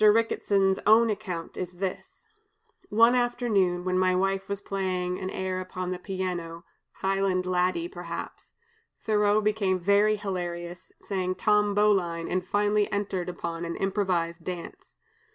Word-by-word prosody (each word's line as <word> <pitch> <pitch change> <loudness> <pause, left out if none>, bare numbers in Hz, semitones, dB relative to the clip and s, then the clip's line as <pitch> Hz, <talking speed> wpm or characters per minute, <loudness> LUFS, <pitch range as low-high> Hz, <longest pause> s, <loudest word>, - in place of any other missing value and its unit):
Ricketson's 205 -3 +3
own 225 +1 +6
account 185 -6 -5
is 180 0 -4
this: 200 - -6 0.6
"One 230 +3 +5
afternoon, 230 -8 +1
when 185 0 +1
my 185 0 +3
wife 195 +1 0
was 200 -1 -2
playing 185 -2 -2
an 185 - -4
air 185 -1 -3
upon 185 0 -5
the 180 - -3
piano, 180 -3 -4 0.3
'Highland 195 -1 0
Laddie,' 185 - +1
perhaps, 370 - -8 0.4
Thoreau 210 -1 +2
became 205 -3 +1
very 200 +4 +3
hilarious, 175 -3 -5
sang 185 -2 -2
'Tom 210 0 +2
Bowline,' 185 -5 +2
and 185 0 0
finally 205 +2 +1
entered 195 -3 -2
upon 170 -1 -4
an 170 0 -3
improvised 185 -4 -1
dance. 175 0 -8
190 Hz, 135 wpm, -27 LUFS, 180-210 Hz, 0.6 s, own